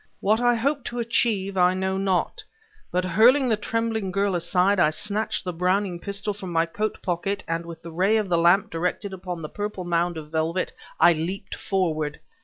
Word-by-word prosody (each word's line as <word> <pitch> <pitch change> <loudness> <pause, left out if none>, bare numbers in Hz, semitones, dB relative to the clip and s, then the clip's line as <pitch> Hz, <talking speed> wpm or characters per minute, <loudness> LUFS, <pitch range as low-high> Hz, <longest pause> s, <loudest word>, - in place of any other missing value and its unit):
What 215 +3 +2
I 245 0 +4
hoped 275 +3 -1
to 245 - -5
achieve, 220 -4 0
I 180 +1 +4
know 190 0 -1
not, 190 -2 0 0.5
but 180 +1 0
hurling 240 +9 +5
the 220 - +3
trembling 220 -1 -2
girl 200 +1 +1
aside, 180 +3 +2
I 155 - +5
snatched 210 +7 -1
the 180 - -3
Browning 180 +1 0
pistol 200 +2 -2
from 195 -3 -7
my 165 0 +2
coat 210 +6 -3
pocket, 195 +3 -2
and 165 +1 -2
with 165 -1 -9
the 170 - -8
ray 190 +7 +2
of 215 -2 0
the 175 - +1
lamp 175 +5 +4
directed 180 +4 -2
upon 180 -3 -6
the - - -3
purple 205 +1 -5
mound 175 0 0
of 150 -1 -8
velvet, 165 +3 -1 0.3
I 175 - +7
leaped 180 +5 -4
forward. 155 -6 -1
190 Hz, 195 wpm, -24 LUFS, 170-205 Hz, 0.5 s, I